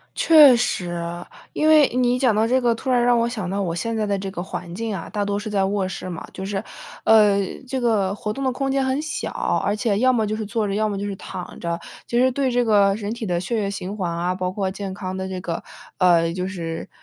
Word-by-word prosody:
确 300 -6 +7
实。 185 -7 -1 0.6
因 310 - +1
为 305 -3 +7
你 250 0 +2
讲 250 -4 +3
到 215 +2 +2
这 255 +3 +2
个， 240 -2 +2
突 245 +3 -4
然 245 -1 +3
让 245 0 +4
我 230 0 +1
想 215 -6 -4
到 200 +2 -1
我 170 -3 -2
现 230 +6 -2
在 215 -1 0
的 200 -1 0
这 195 0 -4
个 175 -2 -5
环 175 -2 -6
境 225 +2 -3
啊， 180 - -6
大 205 -1 -2
多 200 0 -1
是 210 +1 -5
在 200 -2 +1
卧 195 -1 0
室 185 - -6
嘛， 170 -2 -6
就 190 - -6
是， 195 0 -3 0.4
呃， 210 -2 +6 0.3
这 265 0 -2
个 210 -5 +1
活 210 0 -4
动 275 +4 -4
的 260 - +1
空 270 +2 -2
间 270 0 +1
很 265 +2 0
小。 310 - -4 0.3
而 205 - +1
且 210 -2 0
要 255 +3 +4
么 225 -3 +1
就 210 - -2
是 220 - -3
坐 215 +1 -1
着， 195 - -2
要 215 +1 +1
么 200 -2 -3
就 200 - -3
是 200 - -3
躺 180 -1 -8
着。 170 0 -2 0.3
其 235 - 0
实 255 +1 +4
对 270 0 0
这 245 0 +2
个 200 -3 +4
人 210 0 -4
体 235 - -6
的 175 -2 0
血 190 +6 -2
液 200 - -1
循 200 0 -5
环 185 -4 -2
啊， 175 +2 -1
包 185 0 -2
括 190 -1 -1
健 195 0 -5
康 185 -1 -5
的 190 0 -4
这 185 -1 -4
个， 170 -2 -4 0.4
呃， 170 -3 +4
就 180 +1 -3
是 165 -3 -5
205 Hz, 280 characters per minute, -22 LUFS, 190-240 Hz, 0.6 s, 确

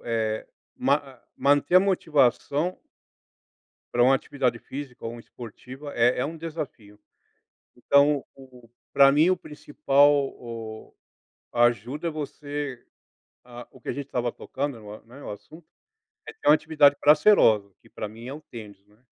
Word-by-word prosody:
eh, 110 -2 -2 0.3
ma 140 - +3
a 135 -4 -14
manter 145 +5 +3
a - - +8
motivação 155 - +1 1.2
pra 120 0 +4
uma 135 +2 +5
atividade 130 -3 -2
física 135 0 -9
ou 115 - -3
uma 120 - -10
esportiva 130 +5 -11
é 120 +1 +3
é 125 - 0
um 160 - -6
desafio. 150 -11 -8 0.8
Então 140 +3 +3
o 125 -3 -16 0.2
pra 140 0 +7
mim 155 +6 +4
o - - +3
principal, 145 -2 +2
o 115 -2 -9 0.6
a 120 - +2
ajuda 120 - 0
você 145 -3 -6 0.6
ah, 120 -1 -11
o - - -17
que - - -12
a - - 0
gente 140 -1 -6
estava 125 -3 -2
tocando 135 +1 -5
no 105 -1 -11
a - - -12
né, 125 +5 -14
o - - -8
assunto, 155 +10 -13 0.6
é - - -8
ter 350 - -3
uma 150 - +9
atividade 150 -2 +3
prazerosa, 145 - +5
que - - -22
pra 105 - -6
mim 115 +3 -12
é 130 - -6
o 155 - -9
tênis, 105 -7 -12
né, 105 +1 -26
135 Hz, 160 wpm, -25 LUFS, 120-145 Hz, 1.2 s, uma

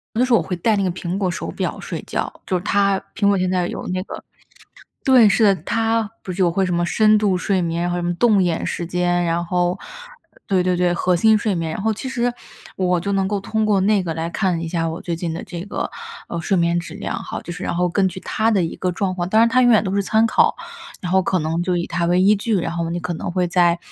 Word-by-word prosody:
有 - - +1
的 250 - +4
时 255 - -1
候 230 - +6
我 - - -1
会 180 - -4
戴 215 +5 +1
那 200 - 0
个 185 - +1
苹 175 +1 -4
果 190 -3 0
手 170 - -4
表 - - -3
睡 - - -6
觉。 - - -3
就 185 - 0
是 175 - -3
它 200 -1 +2
苹 200 -1 +2
果 200 - +3
现 185 0 0
在 180 -1 0
有 - - -6
那 185 0 -1
个 - - -8 0.8
对， 250 -5 +6
是 220 +2 +3
的， 200 -2 +5
它 225 +1 0
不 185 - -5
是 190 +2 -1
有 175 - +3
会 190 +3 +1
什 180 - -1
么 175 0 +1
深 215 +4 +4
度 200 -3 +1
睡 190 +1 0
眠， 170 0 -1
然 175 - -1
后 175 - -1
什 175 - -3
么 175 0 0
动 210 0 +3
眼 170 -2 0
时 170 - -3
间， 175 0 0
然 170 +1 0
后 180 +1 0 0.5
呃， - - -24
对 190 -3 +2
对 180 0 +1
对， 175 0 +2
核 180 +1 +1
心 220 +5 +5
睡 210 -2 -1
眠。 165 -2 -2
然 - - -4
后 220 +1 +1
其 240 +5 -6
实， 245 -2 0 0.4
我 180 -1 +1
就 200 +3 -2
能 195 -1 +1
够 205 0 -1
通 220 +2 -1
过 205 -3 +2
那 205 -1 +3
个， 165 -2 -3
来 165 +1 -3
看 180 -3 0
一 165 - -4
下 165 -1 -1
我 165 +2 -5
最 170 - -3
近 165 -1 -3
的 165 - -5
这 170 - -7
个， 205 - -4 0.4
呃， 170 - -4
睡 190 +3 0
眠 170 0 +2
质 165 -1 -9
量 205 - -4
哈， - - -6
就 175 - -7
是 180 +2 -8
然 - - -2
后 180 0 +2
根 190 +2 +1
据 185 +1 -8
它 220 +4 0
的 195 -5 +2
一 165 - -4
个 185 - -1
状 185 +1 -1
况 175 -1 -3
当 220 +4 +4
然 230 - +5
它 255 +2 +3
永 245 - +5
远 220 - +5
都 190 - -2
是 200 - +1
参 220 +4 +2
考， - - +3 0.4
然 180 - -4
后 190 - +4
可 185 +1 0
能 165 +1 -1
就 180 0 0
以 170 - -2
它 170 0 -2
为 180 +1 +3
依 200 +3 +5
据， 210 +1 0
然 165 -2 -2
后 170 -1 -2
你 175 - -2
可 175 0 -3
能 165 - -4
会 180 0 +1
再， 175 -1 +3
185 Hz, 310 characters per minute, -20 LUFS, 175-205 Hz, 0.8 s, 候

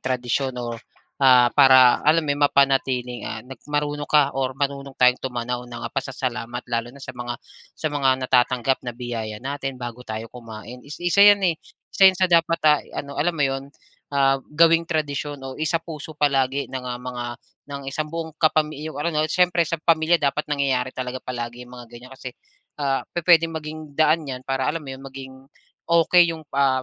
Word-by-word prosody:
tradisyon 130 +1 -2
o, 120 -1 -4 0.5
ah, 125 -3 +6
para 130 -3 +6
alam 155 +2 +3
mo 145 - -1
yun 145 - -5
mapanatiling, 135 -4 +2
ah, 110 - -5
na 130 - -10 0.2
marunong 145 0 -2
ka, 145 -2 +4
or 130 0 -2
marunong 140 -1 -3
tayong 125 0 +4
tumanaw 125 -1 -3
ng, 120 -1 -8
ah, - - -5
pasasalamat 125 -3 -4
lalo 120 -1 -2
na 140 +3 -14
sa 130 - -7
mga 120 -1 -5 0.4
sa - - -3
mga 140 -2 +1 0.2
natatanggap 125 +1 +2
na 120 -2 -7
biyaya 115 -3 -5
natin 135 +2 -5
bago 120 -1 -7
tayo 110 +1 -4
kumain, 115 0 -10
is 145 +3 -10
isa 175 +3 +3
yan, 205 -1 +7
eh. 175 -3 +3 0.4
Isa 195 -1 +7
yan 190 - 0
sa 185 +1 +3
dapat, 165 0 +3
ah, 150 -1 +5
i-ano 140 0 -8
alam 175 +3 +1
mo 145 - +2
yun, 135 0 -3 0.5
ah, 135 -1 +3
gawing 165 +3 +3
tradisyon 150 -2 -2
o 135 - -6
isapuso 155 -1 -3
palagi 140 -1 +1
ng, 130 -1 -5
ah, 125 -1 -4
mga 125 0 -6 0.4
ng 140 -1 -7
isang 150 +3 -3
buong 165 0 -5
kapami 155 -2 +1
yung 155 - -7
ano 150 +4 -2
'no 155 -1 0
siyempre 175 0 +2
sa 170 - -2
pamilya 165 0 +2
dapat 145 +1 0
nangyayari 135 -3 -1
talaga 130 0 -4
palagi 120 -1 -6
yung 125 - -13
mga 120 -1 -10
ganiyan 120 +2 -12
kasi, 130 -1 -8 0.5
ah, 135 -2 0
pu-puwedeng 165 -1 +3
maging 155 0 -8 0.2
daan 155 +2 +3
yan 130 -2 -6
para 135 -1 -1
alam 165 +1 -5
mo - - -6
yung 130 - -12
maging 135 0 -9 0.6
,okey 170 +1 +5
yung 160 -2 -8
pa 135 -2 +1
135 Hz, 190 wpm, -23 LUFS, 125-155 Hz, 0.6 s, yan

